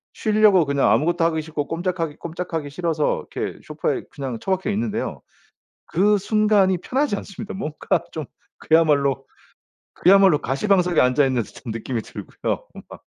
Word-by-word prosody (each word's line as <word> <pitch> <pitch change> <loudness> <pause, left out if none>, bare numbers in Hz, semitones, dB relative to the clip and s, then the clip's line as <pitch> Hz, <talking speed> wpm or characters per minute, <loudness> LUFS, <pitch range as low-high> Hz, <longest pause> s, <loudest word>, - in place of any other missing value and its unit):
쉬려고 210 -5 +4
그냥 140 -1 +2
아무것도 170 +2 +2
하기 160 -1 +1
싫고 150 -2 -4
꼼짝하기 165 -2 -3
꼼짝하기 165 -3 -5
싫어서 160 0 -1
이렇게 - - -3
쇼파에 - - -2
그냥 135 -4 -5
처박혀 190 - -1
있는데요. 220 +2 -2 0.7
그 205 +3 +3
순간이 205 -2 +2
편하지 265 - -1
않습니다. 205 +2 -7
뭔가 160 -2 -2
좀 155 - -5 0.3
그야말로, 140 -4 +2 0.7
그야말로 190 -4 +5
가시방석에 180 - +2
앉아 130 +3 +3
있는 130 -3 0
듯한 115 +3 -9
느낌이 115 +1 -3
들고요 - - -5 0.2
막. - - -11
170 Hz, 360 characters per minute, -22 LUFS, 145-195 Hz, 0.7 s, 그야말로